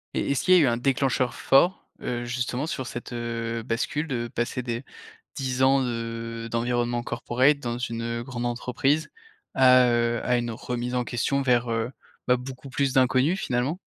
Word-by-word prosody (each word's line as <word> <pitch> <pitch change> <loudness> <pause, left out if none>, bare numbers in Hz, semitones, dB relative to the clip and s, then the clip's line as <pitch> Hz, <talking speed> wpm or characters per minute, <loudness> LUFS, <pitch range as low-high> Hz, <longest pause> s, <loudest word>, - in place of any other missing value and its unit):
Et - - -1
est-ce 140 - 0
qu'il 185 - +5
y - - +8
a - - +6
eu 140 - +4
un 120 - +1
déclencheur 130 0 +1
fort, 175 +8 +3
heu, 120 -1 -3
justement, 125 +4 -2
sur 130 -6 -3
cette, 120 0 -7
heu, 115 -1 -3
bascule, 130 +6 -2
de 120 -5 -2
passer 120 +2 -2
des 120 0 -4 0.5
10 130 -1 -1
ans 135 +1 +5
de 115 -1 -4
d'environnement 120 0 0
corporate 125 +4 +1
dans 120 -3 -3
une, 115 -2 -3
heu, 115 0 -3
grande 120 -1 -5
entreprise, 125 +5 0 0.5
à, 130 -1 +6
heu, 120 0 +1
à 125 0 +2
une 120 -1 -2
remise 125 +2 -4
en 125 -1 +1
question 130 +4 0
vers, 125 -2 +2
heu, 115 +2 -1 0.4
bah, 125 0 +4
beaucoup 130 +2 -9
plus 135 0 0
d'inconnu, 130 +5 +3
finalement. 130 0 -1
125 Hz, 180 wpm, -26 LUFS, 120-130 Hz, 0.5 s, y